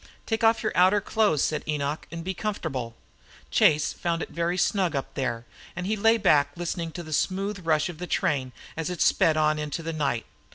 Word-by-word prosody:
"Take 225 0 -1
off 225 0 +4
your - - 0
outer 185 +4 +5
clothes," 205 -7 +1
said 155 - -1
Enoch, 150 0 -2
"an' 165 0 -6
be 190 +2 -2
comfortable." 155 - -4 0.6
Chase 150 0 +4
found 170 -1 -2
it - - -9
very 170 +3 -1
snug 185 -3 +1
up 135 - -3
there, 120 -3 -2 0.3
and 175 +1 -4
he 215 +3 0
lay 225 +2 +4
back 145 -8 +4
listening 170 -1 -3
to 175 - -6
the 155 -1 -7
smooth 195 +4 -1
rush 155 -1 +3
of 175 -3 -8
the 180 - -5
train 145 -11 0 0.2
as 160 +1 -3
it 180 -2 -5
sped 155 -1 +3
on 155 0 +2
into 150 +2 -4
the 165 +1 -3
night. 140 -7 -1
165 Hz, 205 wpm, -26 LUFS, 150-185 Hz, 0.6 s, outer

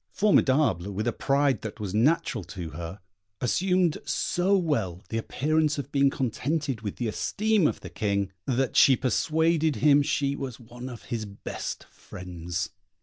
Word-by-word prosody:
Formidable, 135 - +3
with 105 +3 -3
a 120 - 0
pride 140 -1 +1
that 110 0 -7
was 100 -3 -4
natural 125 - +2
to 85 -5 -7
her, 85 +5 -7 0.4
assumed 180 +5 +1
so 190 +3 +1
well 110 - -1
the 115 - -1
appearance 155 +5 0
of 140 0 -5
being 140 -1 +4
contented 135 0 -2
with 105 -3 -4
the 120 - -2
esteem 210 - +1
of - - -3
the - - -8
King, 100 -3 -1 0.2
that 130 0 0
she 135 - +7
persuaded 160 +5 +1
him 145 0 +5
she 140 0 0
was 135 -4 -6
one 120 +2 -9
of 120 -2 -9
his 115 -3 -4
best 100 -1 -6
friends. 90 -1 -6
130 Hz, 155 wpm, -27 LUFS, 105-150 Hz, 0.4 s, she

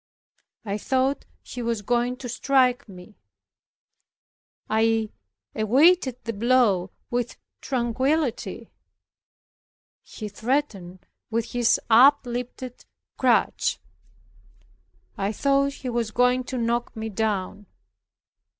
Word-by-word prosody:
I 205 0 -3
thought 265 +4 0 0.2
he 245 - -7
was 230 -3 -2
going 245 +3 0
to 255 - -7
strike 250 -1 +1
me; 185 +2 -13 1.5
I 220 0 +1 0.4
awaited 260 - +3
the 230 - -3
blow 215 -5 +2 0.2
with 245 0 -2 0.2
tranquillity; 260 +2 -1 1.3
he 215 - -8
threatened 205 -6 -3 0.2
with 230 0 -2
his 240 -2 +2
up 265 +5 +6
lifted 245 +1 -6 0.4
crutch; - - +2 1.4
I 195 +1 0
thought 275 +4 +1
he 265 -2 -6
was 235 -2 -1
going 250 +2 +2
to 260 - -4
knock 235 0 -1
me 220 0 -4
down. 205 -1 -2
240 Hz, 95 wpm, -24 LUFS, 220-255 Hz, 1.5 s, up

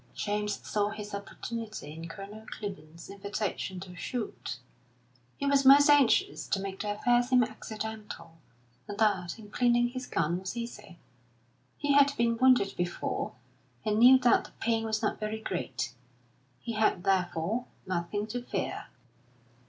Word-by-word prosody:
James 210 0 -1
saw 205 -1 +1
his 210 -1 -7
opportunity 215 -4 -6
in 165 +1 -7
Colonel 200 +5 -9
Clibborn's 170 -6 -8
invitation 200 -1 -4
to 180 -1 -9
shoot; 235 +4 -4 0.8
he - - -3
was 280 0 +4
most 285 +2 +8
anxious 285 -5 +3
to 195 - 0
make 195 0 -5
the 205 0 -1
affair 240 +3 +3
seem 250 0 +4
accidental, 215 -6 -7 0.5
and 205 - -6
that, 205 -5 +1
in 210 -2 -13
cleaning 240 0 +3
his 255 0 -6
gun, 165 +2 0
was 190 +5 -6
easy. 235 -7 -7 0.8
He 290 -1 +1
had 280 0 +5
been 230 -1 +1
wounded 250 -6 +5
before 175 0 -2 0.5
and 215 0 +1
knew 255 +3 +9
that 245 -2 +3
the - - -13
pain 225 -1 +1
was 220 0 -1
not 215 - 0
very 215 +1 -3
great. 130 - -3 0.7
He 230 - -5
had, 215 -5 +2
therefore, 185 +4 0 0.2
nothing 185 +3 -2
to 245 +3 -4
fear. 245 - -3
215 Hz, 145 wpm, -30 LUFS, 190-240 Hz, 0.8 s, knew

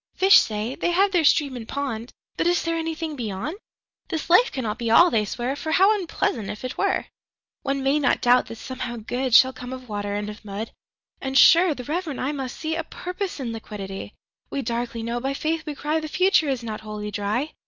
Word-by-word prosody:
5Fish 385 +1 +8
say, 215 +3 -2
they 345 - -1
have 385 +3 +3
their 350 -4 +3
Stream 285 -2 +3
and 230 -2 -7
Pond;6But 260 +2 -4
is 350 0 +2
there 330 0 -1
anything 325 -1 -3
Beyond?7This 285 - -6
life 460 +8 +6
cannot 230 -4 -3
be 235 -1 -1
All, 345 +10 +7
they 215 -2 +2
swear,8For 270 +9 -3
how 390 +5 +5
unpleasant, 335 - -2
if 210 - -6
it 255 - -4
were!9One 275 -1 -4
may 275 +3 +3
not 275 - +2
doubt 245 +1 +4
that, 230 - -7
somehow, 250 +1 -6
Good10Shall 250 +3 +3
come 250 0 -8
of 255 -1 -8
Water 205 -1 -3
and 205 0 -3
of 210 +1 -9
Mud;11And, 220 +5 -6
sure, 335 +1 +7
the 250 - -7
reverent 310 +1 -3
eye 265 - -1
must 270 -4 -5
see12A 320 +1 -2
Purpose 360 -1 -5
in 245 -4 -3
Liquidity.13We 210 +5 -8
darkly 235 -1 -3
know, 235 +1 -2
by 270 +2 -2
Faith 315 +2 -2
we 295 - -4
cry,14The 310 +2 -2
future 365 -3 +3
is 260 -3 -2
not 215 -2 -5
Wholly 210 -1 -6
Dry. 210 +9 -2
260 Hz, 185 wpm, -24 LUFS, 225-315 Hz, -, 5Fish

